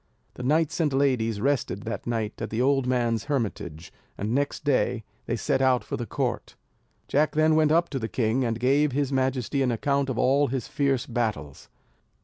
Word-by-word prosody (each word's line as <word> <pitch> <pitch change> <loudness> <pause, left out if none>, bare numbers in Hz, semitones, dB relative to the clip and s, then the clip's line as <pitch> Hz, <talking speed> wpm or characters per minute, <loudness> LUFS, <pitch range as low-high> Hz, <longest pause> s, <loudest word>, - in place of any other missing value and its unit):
The - - -9
knights 155 +6 +1
and 155 -3 +2
ladies 125 -6 +1
rested 120 -5 -1
that 115 0 -5
night 115 -2 -2
at 115 - -3
the 110 - -3
old 135 0 +2
man's 120 -3 0
hermitage, 100 - -3 0.2
and 105 +3 -2
next 145 +2 -1
day 125 -4 +1 0.2
they - - 0
set 130 - 0
out 130 -2 +3
for - - -4
the 120 - -5
court. - - -3 0.5
Jack 150 +2 +2
then 155 +1 +3
went 155 -1 +3
up 170 +2 +3
to 135 - -3
the 110 -1 -4
king, 120 +2 0
and 115 -2 -1
gave 140 +3 +2
his 140 0 0
majesty 130 0 0
an 130 - +2
account 140 +3 0
of 125 - -2
all 140 +3 +3
his 130 -1 -3
fierce 135 -4 0
battles. 105 - -3
130 Hz, 190 wpm, -26 LUFS, 115-140 Hz, 0.5 s, out